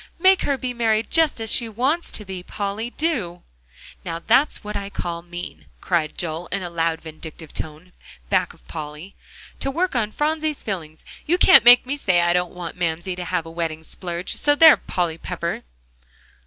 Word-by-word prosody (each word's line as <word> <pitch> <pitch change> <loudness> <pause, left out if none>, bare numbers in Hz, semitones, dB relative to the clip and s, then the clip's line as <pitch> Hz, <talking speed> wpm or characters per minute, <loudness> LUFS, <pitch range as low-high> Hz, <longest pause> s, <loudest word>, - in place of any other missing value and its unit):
make 380 +2 +5
her 280 -1 0
be 255 -1 -3
married 225 -2 +1
just 320 -6 +3
as 225 -1 0
she 235 -2 +1
wants 265 +10 0
to 210 - -4
be, 190 -1 -6
Polly, 205 +5 -4
do." 240 - -2 0.6
"Now 165 -1 -4
that's 240 - +2
what 210 0 -6
I 200 0 -3
call 170 -3 -4
mean," 175 +1 -8
cried 165 -4 -1
Joel 170 0 -3
in 195 -1 -2
a 175 - -5
loud, 165 -1 0
vindictive 160 0 -10
tone 160 +3 -7 0.4
back - - +1
of - - -22
Polly, 150 - -7 0.5
"to 275 - -1
work 340 +3 -1
on 220 -3 +1
Phronsie's 310 +2 -1
feelings. 160 -7 -6 0.2
You 350 +3 +3
can't 365 - +7
make 245 +1 +9
me 280 +3 -3
say 185 -10 +3
I 175 0 +3
don't 180 -1 0
want 175 -1 -7
Mamsie 175 +2 -1
to 180 0 -5
have 175 -3 -1
a 165 - -9
wedding 165 -1 -3
splurge, 175 +1 -5
so 290 0 +3
there, 320 +1 +9
Polly 170 -3 -2
Pepper!" 170 -1 -4
185 Hz, 185 wpm, -22 LUFS, 170-245 Hz, 0.6 s, make